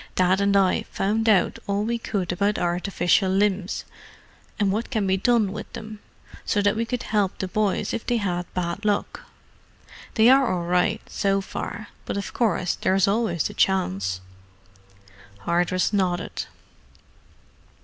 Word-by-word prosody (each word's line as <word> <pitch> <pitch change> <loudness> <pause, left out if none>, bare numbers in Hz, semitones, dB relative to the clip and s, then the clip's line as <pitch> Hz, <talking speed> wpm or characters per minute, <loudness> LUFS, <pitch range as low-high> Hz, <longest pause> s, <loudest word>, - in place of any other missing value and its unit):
Dad 185 +1 +3
and 200 0 +3
I 190 -2 +3
found 220 +3 0
out 205 -3 +3
all 200 +1 0
we 235 +2 -1
could 195 -6 -2
about 200 +3 0
artificial 180 +2 +1
limbs, 195 -1 0 0.7
and 200 -2 +2
what 220 +4 -2
can 220 -6 0
be 190 0 +2
done 215 0 +2
with 215 - -7
them, 215 -1 -8 0.4
so 205 - 0
that 205 +1 +2
we 230 +1 -1
could 245 +1 -3
help 205 -3 0
the 190 - -3
boys 205 +1 0
if 230 - -4
they 240 - +2
had 180 -4 -2
bad 180 +2 -2
luck. 210 - -1 0.9
They 220 0 +5
are 265 0 +5
all 175 -2 -2
right, 180 +5 +1
so 195 -1 0
far, 205 +2 -6 0.2
but - - -3
of 200 - -5
course 185 -6 +1
there 190 - 0
is 195 +1 +3
always 200 -5 +1
the - - -3
chance." 95 - 0 1.2
Hardress 175 - +1
nodded. 185 -3 -1
200 Hz, 155 wpm, -24 LUFS, 180-215 Hz, 1.2 s, They